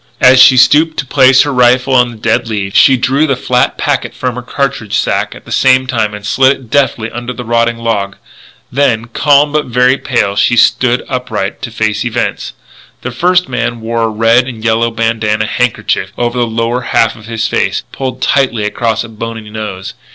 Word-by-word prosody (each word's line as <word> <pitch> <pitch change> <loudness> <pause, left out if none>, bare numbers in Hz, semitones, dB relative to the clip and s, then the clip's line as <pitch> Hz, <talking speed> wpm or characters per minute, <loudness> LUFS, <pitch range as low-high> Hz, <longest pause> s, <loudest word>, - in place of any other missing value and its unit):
As 130 0 +6
she 130 - +7
stooped 155 +5 +4
to 135 - -2
place 130 0 +4
her 145 - -3
rifle 125 +1 +2
on 125 -1 +3
the 115 - -11
dead 115 +1 -1
leaves, 100 -3 -4
she 135 -2 +5
drew 135 +5 +1
the 135 - 0
flat 125 0 0
packet - - -2
from 125 -1 -3
her 125 - -6
cartridge 125 -4 -3
sack 115 - -1
at - - -14
the - - -12
same 130 0 +3
time 110 -5 -2
and 105 0 -10
slid 130 +5 +3
it 125 -4 -17
deftly 120 -5 0
under 120 +1 -6
a 125 - -5
rotting 115 0 0
log. 105 -4 -2 0.6
Then, 120 -4 0
calm 145 +4 +2
but 150 0 0
very 125 +2 +2
pale, 110 -6 -1
she 120 +4 +2
stood 125 +2 +2
upright 125 -6 -4
to 135 - -5
face 110 -1 -2
events. 120 -2 -3 0.5
The 130 - -4
first 180 +8 +1
man 120 - -3
wore 115 +1 -3
a 115 - +1
red 115 +3 +2
and 115 -4 -8
yellow 115 +1 +1
bandanna 115 -2 -1
handkerchief 125 +1 -1
over 120 0 -2
the 120 - +1
lower 115 +2 -2
half 115 -2 +1
of 110 -2 -14
his 115 -1 -2
face, - - -1
pulled 130 -1 -5
tightly 130 -6 +1
across 110 +2 -1
a - - -8
bony 115 -1 -7
nose. 100 -3 -6
120 Hz, 195 wpm, -12 LUFS, 110-130 Hz, 0.6 s, she